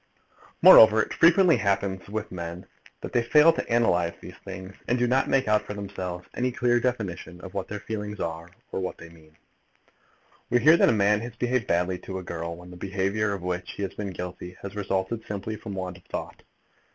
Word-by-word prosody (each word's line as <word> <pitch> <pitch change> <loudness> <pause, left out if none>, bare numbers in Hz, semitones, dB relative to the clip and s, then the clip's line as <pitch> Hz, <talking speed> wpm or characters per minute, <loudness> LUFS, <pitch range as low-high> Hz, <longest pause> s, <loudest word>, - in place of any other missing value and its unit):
Moreover, 110 0 +9
it - - -6
frequently 170 -1 +5
happens 100 -2 -1
with 110 0 -4
men 85 0 -6 0.4
that - - -7
they 120 - +3
fail 150 +7 +5
to - - -5
analyse 90 -8 +2
these - - -10
things, 95 0 -8
and 120 - +1
do 125 - +2
not 130 +2 +1
make 135 -3 +2
out 105 0 +3
for 105 - -7
themselves 95 -3 -6
any 125 +1 -1
clear 120 0 +2
definition 100 -8 -3
of 95 - -10
what 100 -2 -3
their 105 -1 -6
feelings 105 -2 -5
are 85 +1 -4 0.2
or - - -2
what 95 - -4
they 85 - -12
mean. 80 -2 -20 1.1
We 120 - +3
hear 155 +7 +7
that - - +4
a - - +5
man 105 -1 +2
has 120 0 -7
behaved 125 -1 -1
badly 90 +1 0
to 95 +1 -6
a 95 - -6
girl, 85 -1 -5
when 90 +1 -13
the 90 - -11
behaviour 100 +3 -1
of 100 -3 -4
which 90 0 -4
he 100 - -5
has 95 - -4
been 100 -2 -5
guilty 90 0 -7
has 100 0 -7
resulted 100 +2 -2
simply 105 +1 -4
from 105 -1 -7
want 90 -1 -5
of 95 - -20
thought. - - -6
100 Hz, 210 wpm, -26 LUFS, 90-115 Hz, 1.1 s, Moreover